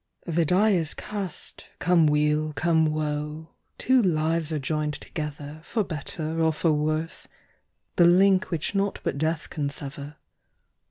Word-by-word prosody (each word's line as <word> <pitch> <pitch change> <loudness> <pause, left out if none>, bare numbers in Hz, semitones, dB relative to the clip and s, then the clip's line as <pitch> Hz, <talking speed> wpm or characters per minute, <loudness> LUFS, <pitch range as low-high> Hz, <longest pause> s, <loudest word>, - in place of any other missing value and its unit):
The 170 -1 +1
die 195 +7 +4
is 165 -6 0
cast, 200 -5 -4
come 175 -3 +4
weal, 150 +1 +1
come 160 +2 +2
woe, 150 +1 -3 0.3
Two 260 0 +3
lives 160 -3 +1
are 155 - 0
joined 150 +1 -2
together, 150 0 -6
For 220 +4 -1
better 160 0 -4
or 160 0 +4
for 160 +1 +1
worse, 155 +2 -2 0.7
the 175 - +7
link 185 +2 +5
Which 165 +1 -2
naught 200 0 0
but 140 - -2
death 160 +1 -1
can 145 -2 -2
sever. 140 0 -7
155 Hz, 145 wpm, -26 LUFS, 150-175 Hz, 0.7 s, the